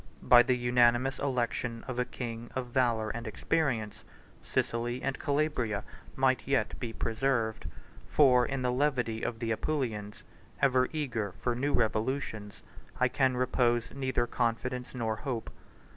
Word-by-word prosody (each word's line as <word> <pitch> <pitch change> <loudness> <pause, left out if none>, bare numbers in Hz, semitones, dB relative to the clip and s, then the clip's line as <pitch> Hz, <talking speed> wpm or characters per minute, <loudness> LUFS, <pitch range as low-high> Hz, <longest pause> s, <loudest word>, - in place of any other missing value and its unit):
By 125 -1 +8
the 125 +1 +2
unanimous 120 +2 +3
election 120 -3 -2
of 125 -2 -3
a 125 - +2
king 120 -2 -6
of 130 -2 -3
valor 120 -4 +1
and 115 0 -6
experience, 115 -3 -1 0.4
Sicily 120 +2 -1
and 135 -1 -2
Calabria 140 -8 0 0.3
might 130 -1 +2
yet 130 -6 +1
be 120 - -4
preserved; 115 -2 -1 0.4
130 - - -24
for 125 -4 +6
in 135 +1 -2
the 125 - +1
levity 125 -4 0
of 120 - -2
the 115 0 -2
Apulians, 110 -6 -2 0.4
ever 130 -2 +3
eager 120 - -2
for 125 - -2
new 140 +4 -1
revolutions, 110 -2 -1 0.4
I 130 -1 +4
can 130 -1 +1
repose 120 -2 +1
neither 130 -3 0
confidence 125 +2 -2
nor 110 -3 -1
hope. 120 -2 -4
125 Hz, 145 wpm, -30 LUFS, 115-130 Hz, 0.4 s, By